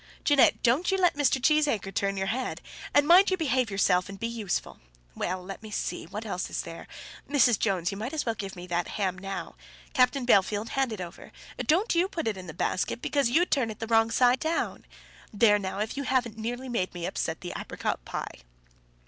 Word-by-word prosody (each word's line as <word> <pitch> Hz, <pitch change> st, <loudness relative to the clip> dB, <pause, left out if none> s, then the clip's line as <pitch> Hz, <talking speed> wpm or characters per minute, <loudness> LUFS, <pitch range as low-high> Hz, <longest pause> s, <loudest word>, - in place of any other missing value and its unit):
"Jeannette, 290 Hz, -2 st, +4 dB
don't 260 Hz, +9 st, +3 dB
you 385 Hz, -, +2 dB
let 360 Hz, -2 st, +3 dB
Mr. 285 Hz, -2 st, +2 dB
Cheesacre 285 Hz, -8 st, +2 dB
turn 195 Hz, +1 st, -1 dB
your 190 Hz, -, -1 dB
head; 255 Hz, +1 st, -3 dB, 0.3 s
and 290 Hz, 0 st, +4 dB
mind 365 Hz, +4 st, +7 dB
you 375 Hz, -, +1 dB
behave 260 Hz, -7 st, +1 dB
yourself 185 Hz, -2 st, +2 dB
and 195 Hz, 0 st, -9 dB
be -, -, -2 dB
useful. 225 Hz, -5 st, -3 dB, 0.3 s
Well; 185 Hz, -, -3 dB
let 195 Hz, +3 st, -8 dB
me 220 Hz, -, -9 dB
see; -, -, -3 dB
what -, -, -6 dB
else -, -, -3 dB
is -, -, -3 dB
there? -, -, -9 dB, 0.4 s
Mrs. 250 Hz, -6 st, +4 dB
Jones, 185 Hz, -5 st, 0 dB
you 195 Hz, -, -6 dB
might 235 Hz, +5 st, -4 dB
as 315 Hz, -, -2 dB
well 230 Hz, -, 0 dB
give 195 Hz, -3 st, -6 dB
me 175 Hz, 0 st, -8 dB
that 175 Hz, 0 st, -1 dB
ham 190 Hz, -3 st, -1 dB
now. 195 Hz, +1 st, -6 dB, 0.4 s
Captain 255 Hz, 0 st, +3 dB
Bellfield, 205 Hz, -1 st, +3 dB
hand 270 Hz, -3 st, 0 dB
it 210 Hz, -4 st, -5 dB
over. 175 Hz, 0 st, -9 dB, 0.4 s
Don't 365 Hz, +9 st, +3 dB
you 350 Hz, +2 st, +3 dB
put 330 Hz, -8 st, -4 dB
it 220 Hz, -, 0 dB
into 185 Hz, -1 st, -9 dB
the 160 Hz, -, -8 dB
basket, 185 Hz, -, -1 dB
because 280 Hz, -1 st, +1 dB
you'd 340 Hz, +8 st, +2 dB
turn 255 Hz, -6 st, +2 dB
it 215 Hz, -, -7 dB
the 225 Hz, -, -4 dB
wrong 225 Hz, 0 st, +3 dB
side 250 Hz, +2 st, +3 dB
down. 320 Hz, +1 st, -2 dB, 0.5 s
There 210 Hz, 0 st, +4 dB
now, 190 Hz, -1 st, -4 dB
if 215 Hz, +2 st, -2 dB
you 280 Hz, -, -2 dB
haven't 255 Hz, -5 st, 0 dB
nearly 240 Hz, +4 st, -4 dB
made 190 Hz, -8 st, -2 dB
me 175 Hz, -1 st, -4 dB
upset 160 Hz, -3 st, -3 dB
the 175 Hz, -, -6 dB
apricot -, -, -3 dB
pie." -, -, -6 dB
230 Hz, 215 wpm, -28 LUFS, 195-270 Hz, 0.5 s, mind